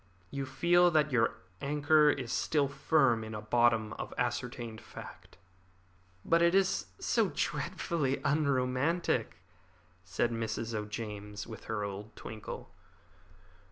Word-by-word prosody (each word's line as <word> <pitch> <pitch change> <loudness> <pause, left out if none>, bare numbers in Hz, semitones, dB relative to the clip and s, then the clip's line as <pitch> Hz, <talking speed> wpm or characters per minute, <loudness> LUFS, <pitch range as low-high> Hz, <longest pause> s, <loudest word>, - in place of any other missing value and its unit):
You 140 -1 -3
feel 175 +6 +4
that 155 -3 +2
your 120 -3 +2 0.3
anchor 150 +1 +4
is 130 -5 -1
still 145 -3 +2
firm 135 -4 +2
in 110 0 -6
a - - -3
bottom 115 -1 +2
of - - -5
ascertained 120 -2 -3
fact." - - -11 0.9
"But 165 0 +4
it 170 +2 +4
is 195 -1 +2
so - - +1
dreadfully 145 -7 -1
unromantic," 140 - +1 0.6
said 100 +6 0
Mrs. 115 0 -3
O'James, 105 -1 -5
with 110 -1 -10
her 110 -2 -2
old 100 +2 -6
twinkle. 110 -1 -8
125 Hz, 120 wpm, -31 LUFS, 110-150 Hz, 0.9 s, feel